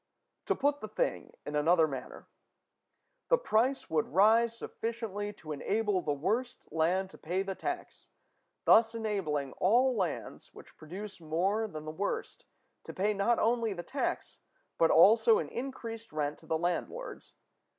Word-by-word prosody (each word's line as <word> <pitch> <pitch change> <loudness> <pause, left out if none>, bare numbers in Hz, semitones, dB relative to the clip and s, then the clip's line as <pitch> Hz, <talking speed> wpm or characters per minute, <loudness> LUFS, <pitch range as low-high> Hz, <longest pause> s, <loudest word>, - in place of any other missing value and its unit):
To - - +2
put 285 0 0
the 215 - -5
thing - - -2
in 150 - -4
another 160 +2 +4
manner: 135 -3 -8 1.0
the - - +5
price 265 - +1
must 155 -2 0
rise 225 +6 +4
sufficiently 225 -4 -4
to 155 -6 -10
enable 205 +6 0
the 150 - -1
worst 220 - -1
land 180 +4 +1
to - - -14
pay 180 +4 -1
the 195 0 -3
tax, 355 - -6 0.6
thus 225 +1 +6
enabling 185 -11 -2
all 245 +7 +4
lands 185 -7 -4
which - - -14
produce 190 +6 -8
more 190 +8 0
than 155 -6 -8
the 155 - -4
worst 200 - -4 0.4
to - - -8
pay 205 +3 +1
not 205 +4 +2
only 230 -2 +1
the 175 -2 -6
tax, 275 +7 -3 0.4
but 165 - +5
also 225 - +6
an - - -3
increased 230 -3 -6
rent 150 -1 -2
to - - -18
the 160 - +1
landlords. 180 - -4
205 Hz, 150 wpm, -31 LUFS, 165-230 Hz, 1.0 s, thus